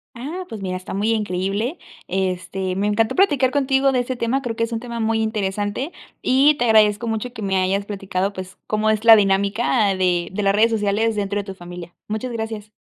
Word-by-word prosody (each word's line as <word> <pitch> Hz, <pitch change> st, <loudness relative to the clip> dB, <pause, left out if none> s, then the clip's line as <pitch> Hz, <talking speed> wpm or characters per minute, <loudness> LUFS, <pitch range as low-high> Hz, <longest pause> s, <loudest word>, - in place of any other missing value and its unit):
Ah, 315 Hz, +10 st, -6 dB
pues 220 Hz, -3 st, -8 dB
mira, 185 Hz, -1 st, -3 dB
está 185 Hz, -, -8 dB
muy 210 Hz, +3 st, 0 dB
increíble. 210 Hz, -, -1 dB, 0.3 s
Este, 185 Hz, 0 st, -2 dB
me 200 Hz, +2 st, -1 dB
encantó 220 Hz, +2 st, +1 dB
platicar 290 Hz, -9 st, +3 dB
contigo 270 Hz, -1 st, +2 dB
de 255 Hz, -, +1 dB
ese 255 Hz, +1 st, -4 dB
tema, 250 Hz, +3 st, -1 dB
creo 230 Hz, -2 st, -3 dB
que 230 Hz, -, -1 dB
es 230 Hz, -, -2 dB
un 225 Hz, -, -2 dB
tema 235 Hz, -1 st, -6 dB
muy 225 Hz, 0 st, +1 dB
interesante 210 Hz, -, -2 dB, 0.3 s
y 275 Hz, +4 st, +4 dB
te 245 Hz, -, +1 dB
agradezco 215 Hz, 0 st, +4 dB
mucho 225 Hz, +3 st, -3 dB
que 220 Hz, -, -8 dB
me 190 Hz, -1 st, 0 dB
hayas 195 Hz, +2 st, 0 dB
platicado, 195 Hz, -1 st, -2 dB
pues, 185 Hz, -1 st, -9 dB
cómo 215 Hz, 0 st, +1 dB
es 215 Hz, +1 st, -2 dB
la 225 Hz, -, +10 dB
dinámica 200 Hz, +1 st, +2 dB
de 175 Hz, -2 st, +1 dB
de 205 Hz, +1 st, -3 dB
las 195 Hz, -, +3 dB
redes 220 Hz, +3 st, +4 dB
sociales 220 Hz, +1 st, +1 dB
dentro 205 Hz, 0 st, -1 dB
de 205 Hz, -, -3 dB
tu 195 Hz, -1 st, -7 dB
familia. 175 Hz, -1 st, -10 dB
Muchas 220 Hz, +4 st, -3 dB
gracias. 220 Hz, -2 st, -5 dB
215 Hz, 210 wpm, -21 LUFS, 195-235 Hz, 0.3 s, la